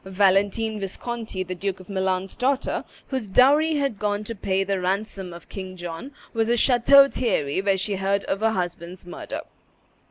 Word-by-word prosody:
Valentine 200 +3 +2
Visconti, 210 0 -4
the 185 - -5
Duke 190 +1 -3
of 185 - -13
Milan's 190 -1 -1
daughter, 265 +2 0 0.3
whose 260 -6 -2
dowry 290 +9 +5
had 275 -8 -1
gone 205 0 -1
to 230 - -5
pay 195 -2 0
the 195 0 -1
ransom 190 0 -2
of 170 0 -11
King 185 -2 -7
John, 175 +9 -6 0.2
was 225 -1 +1
at 240 - +3
Chateau 270 +3 +6
Thierry 190 - 0
when 195 -1 +2
she 195 +1 -2
heard 195 +1 0
of 195 - -2
her 225 +1 +3
husband's 175 -2 -4
murder. 175 - -6
200 Hz, 170 wpm, -24 LUFS, 185-230 Hz, 0.3 s, Chateau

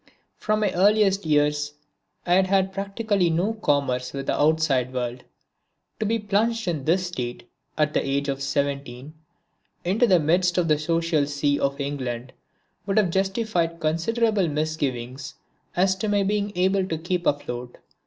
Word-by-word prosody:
From 215 0 -1
my 205 -3 +1
earliest 200 -1 +3
years 145 -1 +1 0.5
I 175 - +2
had 190 +1 +4
had 190 0 +2
practically 200 -1 0
no 175 +7 +1
commerce 140 - 0
with 135 -1 -4
the - - 0
outside 145 -5 +2
world. 125 -1 -4 0.8
To 215 - 0
be 225 +2 +1
plunged 220 +1 0
in 155 -6 -2
this 180 +3 +2
state, 125 -8 -5 0.3
at 150 -1 +1
the - - +1
age 140 +1 -1
of 135 -1 -2
17, 140 -1 -3 0.7
into 210 +7 +3
the 185 -4 +5
midst 175 +3 +2
of 175 -2 +2
the 150 -1 +3
social 165 -2 +1
sea 145 0 0
of 140 +1 -1
England 130 -3 -4 0.5
would 195 - 0
have 200 -5 +3
justified 190 -3 0
considerable 200 +5 +1
misgiving 145 -5 -2 0.6
as 190 +1 +3
to 215 - -2
my 205 -1 +2
being 205 +1 0
able 190 +1 +2
to 160 - -2
keep 175 +2 -2
afloat. 125 -4 -2
165 Hz, 155 wpm, -24 LUFS, 140-195 Hz, 0.8 s, the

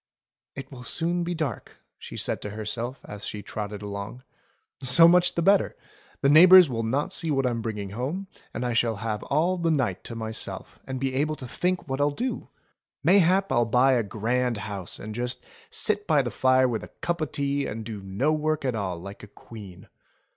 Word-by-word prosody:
"It 135 - -8
will 130 -2 -10
soon 170 +7 -1
be 175 +1 -3
dark," 150 -9 -4 0.2
she - - -9
said - - -1
to 105 - -5
herself 115 +5 -4
as 105 0 -8
she 105 -1 -5
trotted 105 -1 -6
along. 100 +5 -6 0.6
"So 135 +6 +7
much 180 +1 +4
the 170 - 0
better! 200 +2 +3 0.4
The 140 - +3
neighbours 180 +4 +9
will 120 -4 -2
not 130 +6 -1
see 165 - -1
what 135 -3 +1
I'm 120 -2 -1
bringing 105 -3 -4
home, 135 - -3 0.3
and 120 - -4
I 120 - -1
shall 115 -1 +1
have 105 0 -3
all 170 +6 +1
the 170 -1 +1
night 130 - 0
to 115 - -6
myself, 110 -1 -5
and 130 -1 -4
be 135 0 -1
able 150 +3 0
to 130 -3 -9
think 180 +7 -2
what 135 +1 -2
I'll 145 - +3
do! 245 - -4 0.5
Mayhap 190 0 +4
I'll 120 -2 +3
buy 125 +4 +4
a 120 - +3
grand 115 +3 -1
house 100 -4 -5
and 110 +1 -7
just 120 +2 -4 0.2
sit 215 - -1
by 150 -5 +3
the 120 - -4
fire 130 +3 +3
with 115 -3 -3
a - - -8
cup 170 -1 -1
o' - - +2
tea 140 -1 -2
and 110 +1 -6
do 110 -3 -6
no 100 +11 0
work 155 -1 -1
at 130 - 0
all 95 -5 -3
like 100 +3 -9
a 105 - -11
queen. 100 -3 -12
125 Hz, 205 wpm, -26 LUFS, 110-155 Hz, 0.6 s, neighbours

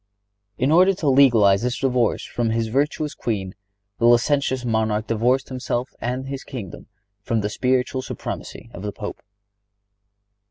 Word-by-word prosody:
In 130 +4 +1
order 185 +4 +5
to 155 -5 0
legalize 115 -8 +5
his 125 +1 -1
divorce 125 -4 +1
from 120 -2 -2
his 115 0 -1
virtuous 145 +4 0
queen 100 -8 -3 0.5
the 120 - +4
licentious 130 +1 +2
monarch 110 -2 0
divorced 120 +4 +1
himself 125 -1 -3
and 125 +3 -3
his 135 0 -5
kingdom 115 -10 -8 0.3
from 110 +2 -1
the 105 - -2
spiritual 130 +1 0
supremacy 120 -2 -7
of 90 - -8
the 105 0 -3
Pope. 105 0 -7
125 Hz, 145 wpm, -22 LUFS, 110-135 Hz, 0.5 s, order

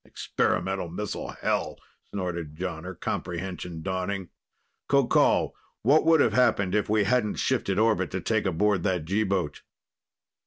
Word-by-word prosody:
"Experimental 95 -2 -1
missile, 100 +4 -4
hell!" - - 0 0.3
snorted 85 -5 -4
Jonner, 90 0 -5
comprehension 90 -1 -4
dawning. 95 0 -3 0.6
"Qoqol, 140 -3 +3 0.3
what 145 +6 +4
would 165 -2 +6
have 115 - +3
happened 115 -6 +3
if 105 -1 +1
we 105 0 +3
hadn't 110 -1 +1
shifted 110 -7 0
orbit 110 0 +2
to 95 - -3
take 110 +2 0
aboard 95 +2 +2
that 90 -4 0
G 100 +6 +1
boat?" 95 -6 -1
95 Hz, 130 wpm, -27 LUFS, 90-110 Hz, 0.6 s, would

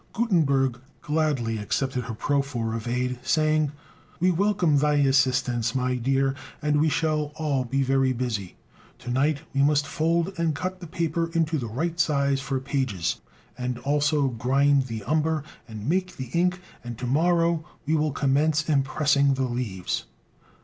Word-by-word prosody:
Gutenberg 140 - +2 0.2
gladly 145 -8 0
accepted 125 +4 -2
her 115 -2 -5
proffer 135 -4 -1
of 115 0 -4
aid, 125 +1 -1
saying, 155 +3 +2 0.5
"We 180 +2 +3
welcome 180 -4 +2
thy 150 +1 +2
assistance, 130 -4 +2
my 130 0 +1
dear, 135 +2 +1 0.3
and 150 -1 +1
we 160 - +3
shall 150 -1 0
all 140 -5 -1
be 135 +3 0
very 135 0 +2
busy. 115 -7 -3 0.4
To 125 -1 -6
night 140 +3 +1
we 140 - +2
must 145 0 +3
fold 170 +5 0
and 165 -3 +1
cut 185 +4 -4
the 175 - -8
paper 165 +1 -1
into 165 -2 +1
the 120 - -4
right 160 +9 -3
size 140 -3 +2
for 135 -1 -2
pages, 130 - -2 0.3
and 125 -1 -3
also 145 +2 +1
grind 135 +3 +2
the 110 -3 -5
umber 155 +3 0 0.2
and 110 -1 -7
make 180 +2 0
the 130 -2 -6
ink, 180 +1 +1 0.2
and 120 -2 -6
to 125 - -5
morrow 165 +4 +2 0.2
we 155 - 0
will 155 -1 +1
commence 150 +3 +1
impressing 140 -1 +2
the 130 - -1
leaves." 120 -8 -3
140 Hz, 155 wpm, -25 LUFS, 125-155 Hz, 0.5 s, We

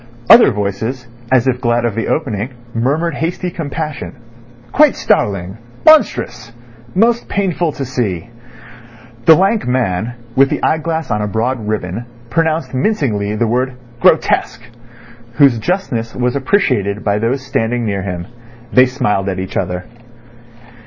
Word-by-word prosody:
Other 235 - +9
voices, 110 +5 -3 0.3
as 130 -1 +3
if 125 -1 0
glad 120 -1 +1
of 115 - 0
the 115 +2 -2
opening, 120 -7 -1 0.2
murmured 145 +8 0
hasty 175 +4 -3
compassion. 155 -2 -5 0.6
"Quite 300 -1 +5
startling," 100 - 0 0.3
"Monstrous," 125 - +3 0.4
"Most 230 +4 +2
painful 180 -4 0
to 135 - -4
see." 115 -9 -2 1.0
The 160 - +8
lank 195 - +1
man, 120 -2 -1 0.2
with 135 +1 +5
the - - -3
eyeglass 160 0 -1
on 105 - 0
a 105 - -1
broad 110 +2 -2
ribbon, 105 +2 -3 0.2
pronounced 160 -5 0
mincingly 130 - 0
the 115 - +1
word 125 +3 0 0.3
"Grotesque," 110 +1 +2 0.7
whose 135 -4 +4
justness 115 - -2
was 125 +1 0
appreciated 130 - 0
by 105 0 +1
those 125 +5 -1
standing 120 -1 -1
near 100 -2 -1
him. 90 -2 -5 0.5
They 130 0 +6
smiled 115 -7 -1
at 95 - -3
each 95 +1 -5
other. 90 -1 -2
125 Hz, 135 wpm, -16 LUFS, 105-155 Hz, 1.0 s, Other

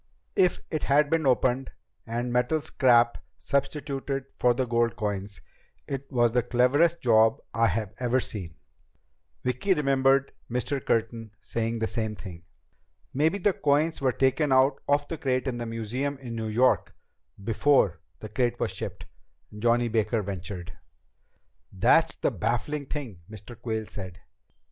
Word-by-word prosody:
If 180 -2 +3
it 155 - -2
had 145 +2 +3
been 160 -3 +2
opened 130 +1 +2 0.4
and 120 +1 -2
metal 125 +6 +2
scrap 120 -5 +3 0.2
substituted 140 -1 -2
for 120 -1 +3
the 130 +1 0
gold 120 -1 +1
coins, 100 -2 -4 0.5
it 140 0 -5
was 120 -3 +3
the 125 +1 +2
cleverest 145 +9 +2
job 110 -2 +4
I've 110 -3 +1
ever 125 +1 +2
seen." 90 -10 -5 0.9
Vicki 130 +10 +1
remembered 135 -1 +2 0.2
Mr. 125 +3 -2
Curtin 115 0 -1
saying 115 0 -2
the 110 0 -1
same 110 -2 -3
thing. 90 -4 -10 0.7
"Maybe 155 +8 +2
the 200 0 +2
coins 150 +1 +1
were 130 -2 +3
taken 135 +3 +1
out 135 +1 +4
of 145 0 +2
the 165 - -5
crate 130 0 0
in 120 -2 -2
the 120 - -4
museum 120 +5 -3
in 125 -3 -8
New 110 -1 -3
York 120 +4 +2 0.5
before 110 - +2 0.2
the 110 - -7
crate 120 +2 0
was - - -1
shipped," - - -6 0.5
Johnny 120 +2 +2
Baker 110 -1 0
ventured. 95 -2 -6 1.0
"That's - - +3
the - - 0
baffling 125 +6 -2
thing," 125 - -6
Mr. 110 +2 -10
Quayle 110 -1 -3
said. 95 -3 -8
120 Hz, 145 wpm, -27 LUFS, 110-140 Hz, 1.0 s, job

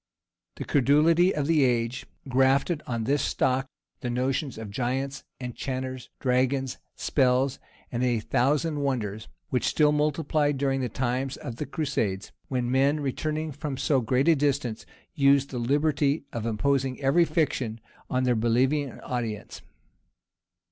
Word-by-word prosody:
The - - -5
credulity 155 +6 +4
of 150 -2 0
the 155 -2 +3
age 120 0 0 0.2
grafted 135 +5 +2
on 115 -2 -2
this 140 +5 +1
stock 130 +1 +1 0.3
the 125 - -3
notion 130 +3 -1
of 110 -2 -7
giants, 135 +4 -2 0.2
enchanters, 130 0 -5
dragons, 130 +1 0 0.2
spells,[*] 130 -1 +1 0.3
and 120 - -2
a 120 -2 +2
thousand 145 +7 +1
wonders, 110 -7 -2 0.2
which 125 - +1
still 150 -1 +3
multiplied 150 -1 +1
during 135 -1 0
the 125 - -1
times 130 +3 -2
of 115 - -7
the 150 - -4
crusades; 130 - -2 0.2
when 125 -2 -1
men, 140 +3 +3
returning 155 +3 -2
from 145 -1 -5
so 135 -1 +2
great 125 +5 +1
a 165 - +6
distance, 135 -6 -1 0.3
used 140 -2 +3
the 125 - -3
liberty 145 +3 +1
of 115 -1 -3
imposing 130 +3 0
every 140 +5 +4
fiction 130 -9 -1 0.3
on 130 0 +1
their 125 -1 +3
believing 125 +5 +1
audience. 115 -4 -4
135 Hz, 140 wpm, -27 LUFS, 125-145 Hz, 0.3 s, a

